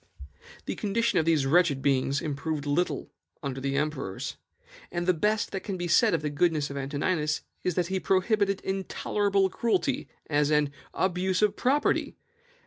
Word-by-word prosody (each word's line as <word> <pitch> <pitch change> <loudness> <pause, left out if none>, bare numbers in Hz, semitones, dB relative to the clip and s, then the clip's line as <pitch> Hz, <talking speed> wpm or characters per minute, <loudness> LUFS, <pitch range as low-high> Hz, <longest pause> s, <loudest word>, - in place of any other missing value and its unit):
"The - - -2
condition 230 +3 +1
of 160 - +1
these 160 -4 +3
wretched 145 -2 +3
beings 140 0 +2
improved 150 0 -3
but 145 - -2
little 175 +5 -1 0.3
under 135 -1 -3
the 135 0 -1
emperors; 140 -10 -3 0.6
and 175 0 -2
the 185 - +4
best 210 +6 0
that 195 - -2
can 195 -1 -5
be 175 0 -3
said 215 +1 +4
of 155 - -3
the 150 - -1
goodness 150 -1 +1
of - - -6
Antoninus 150 +3 -1 0.2
is 180 - 0
that 180 - +1
he 190 +2 -1
prohibited 195 +1 +1
intolerable 195 +1 0
cruelty, 220 -7 0 0.2
as 145 -1 +1
an 150 -2 +2 0.2
ABUSE 185 +1 +1
OF 210 -1 +3
PROPERTY. 280 +4 +1
170 Hz, 165 wpm, -28 LUFS, 145-195 Hz, 0.6 s, the